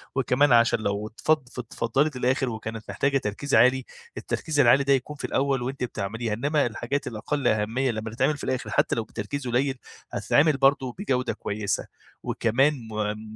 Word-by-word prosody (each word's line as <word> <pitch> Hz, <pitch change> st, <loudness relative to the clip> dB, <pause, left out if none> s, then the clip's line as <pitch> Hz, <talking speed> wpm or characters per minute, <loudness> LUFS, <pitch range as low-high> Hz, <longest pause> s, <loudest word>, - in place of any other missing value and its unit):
وكمان 135 Hz, +2 st, +3 dB
عشان 115 Hz, -1 st, +5 dB
لو 105 Hz, 0 st, -2 dB
اتفض 140 Hz, +4 st, 0 dB
اتفضّلت 125 Hz, +5 st, -1 dB
للآخر، 130 Hz, +1 st, +1 dB
وكانت 110 Hz, -1 st, -6 dB
محتاجة 140 Hz, +8 st, +1 dB
تركيز 135 Hz, +4 st, -2 dB
عالي، 130 Hz, +1 st, +5 dB, 0.3 s
التركيز 155 Hz, -3 st, -2 dB
العالي 130 Hz, +2 st, +6 dB
ده 140 Hz, -, +3 dB
يكون 135 Hz, +3 st, -1 dB
في -, -, -5 dB
الأول 135 Hz, -1 st, 0 dB
وأنتِ 130 Hz, +1 st, -4 dB
بتعمليها، 110 Hz, 0 st, -3 dB
إنما 145 Hz, +6 st, +1 dB
الحاجات 120 Hz, +5 st, -3 dB
الأقل 130 Hz, +5 st, -2 dB
أهمية 115 Hz, +5 st, +1 dB
لمّا 110 Hz, 0 st, -4 dB
تتعمل 135 Hz, +6 st, +1 dB
في -, -, -10 dB
الآخر 130 Hz, -1 st, -2 dB
حتى -, -, +1 dB
لو 115 Hz, -, -1 dB
بتركيز 120 Hz, +6 st, -5 dB
قليل، 130 Hz, +3 st, 0 dB, 0.3 s
هتتعمل 150 Hz, -1 st, +3 dB
برضه 135 Hz, -2 st, +3 dB
بجودة 130 Hz, -10 st, -1 dB
كويسة. 105 Hz, 0 st, -3 dB, 0.4 s
وكمان 135 Hz, +6 st, +2 dB, 0.2 s
م 110 Hz, 0 st, -4 dB
125 Hz, 160 wpm, -25 LUFS, 110-140 Hz, 0.4 s, العالي